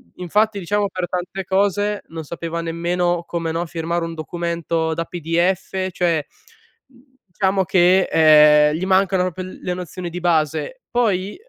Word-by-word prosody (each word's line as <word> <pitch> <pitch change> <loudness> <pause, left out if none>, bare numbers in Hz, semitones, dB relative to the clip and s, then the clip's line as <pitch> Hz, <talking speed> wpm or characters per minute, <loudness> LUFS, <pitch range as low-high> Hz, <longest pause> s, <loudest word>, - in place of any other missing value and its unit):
infatti, 205 +4 0
diciamo, 200 +3 -1
per 185 -2 -4
tante 180 +2 -4
cose 205 +2 0
non 160 -1 -7
sapeva 170 +2 -5
nemmeno 170 +1 -1
come, 165 -2 -3
no, 170 +2 -2
firmare 170 +1 -3
un 165 - -6
documento 165 0 -2
da 165 +1 -3
PDF, 180 +3 -1
cioè, 170 -4 0 1.0
diciamo 190 0 0
che, 185 0 +4
ehm, 150 -1 +6
gli 175 +4 -2
mancano 190 -1 +2
proprio 185 0 -4
l 185 - -10
le 180 - -2
nozioni 180 0 -6
di 175 - -6
base. 165 - 0
Poi, 205 -5 0
175 Hz, 145 wpm, -20 LUFS, 165-190 Hz, 1.0 s, ehm